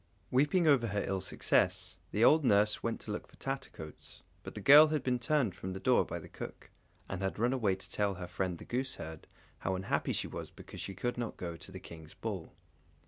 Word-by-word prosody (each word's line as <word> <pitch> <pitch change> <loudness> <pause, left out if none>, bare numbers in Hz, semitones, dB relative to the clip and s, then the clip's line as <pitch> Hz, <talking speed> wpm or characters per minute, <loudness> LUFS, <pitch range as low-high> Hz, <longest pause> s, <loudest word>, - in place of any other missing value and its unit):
Weeping 150 +7 +3
over 135 -6 +5
her 100 -1 -1
ill 95 -1 -1
success, 90 -1 +1
the 105 - +1
old 155 +5 +6
nurse 105 -3 +3
went 115 0 -2
to 105 - -5
look 105 - -4
for - - -20
Tattercoats; 135 - -7 0.2
but - - -9
the - - -4
girl 145 +3 +9
had 150 -3 -1
been 125 -2 +1
turned 125 - +1
from 95 +1 -6
the 95 - -5
door - - +4
by - - -4
the - - -9
cook, - - -9 0.4
and 95 -1 -4
had 95 0 -2
run 120 +4 +2
away 105 -7 +2
to 95 - -8
tell 100 -2 0
her 90 0 -6
friend 90 0 -2
the - - -11
gooseherd, 125 - -3 0.3
how 95 - -1
unhappy 95 +1 -1
she - - 0
was - - -6
because - - -10
she 95 - -5
could 120 +5 -2
not 115 -2 -3
go 85 -2 -4
to 80 +4 -12
the 95 - -7
King's 80 -3 -12
ball. - - -5
105 Hz, 220 wpm, -33 LUFS, 95-130 Hz, 0.4 s, girl